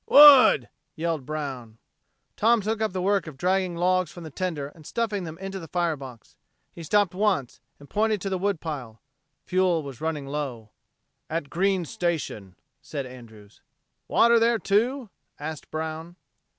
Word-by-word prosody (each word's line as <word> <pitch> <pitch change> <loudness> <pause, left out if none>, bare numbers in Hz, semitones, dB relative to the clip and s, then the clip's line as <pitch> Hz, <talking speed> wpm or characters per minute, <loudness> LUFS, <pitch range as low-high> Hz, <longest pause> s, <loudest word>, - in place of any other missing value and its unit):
"Wood!" 275 - +9 0.3
yelled 160 -4 -2
Brown. 135 -7 -5 0.6
Tom 230 +1 +3
took 220 +2 -2
up 220 - +1
the 185 -1 -3
work 200 -2 +1
of 150 -4 -9
dragging 185 +2 0
logs 180 0 +1
from 175 - -10
the 160 - -8
tender 155 -4 -3
and 155 +1 -17
stuffing 205 +1 -2
them 160 0 -7
in 195 +2 -6
the 190 -4 -7
fire 170 -1 0
box. 130 -5 -12 0.4
He 170 - -10
stopped 200 +3 +2
once, 190 - 0 0.2
and 145 - -14
pointed 215 +2 +1
to 195 - -2
the 190 - -1
wood 200 -2 0
pile. 130 -9 -6 0.5
Fuel 180 -3 +2
was 135 -2 -9
running 160 -3 -2
low. 135 -6 -5 0.6
"At 160 -3 -3
Green's 185 -1 0
Station," 160 - -3 0.3
said 140 -3 -5
Andrews. 110 -5 -14 0.5
"Water 235 0 +5
there, 230 +1 +3
too?" 225 +3 0 0.3
asked 155 0 -7
Brown. 160 +2 -5
170 Hz, 160 wpm, -26 LUFS, 145-195 Hz, 0.6 s, Wood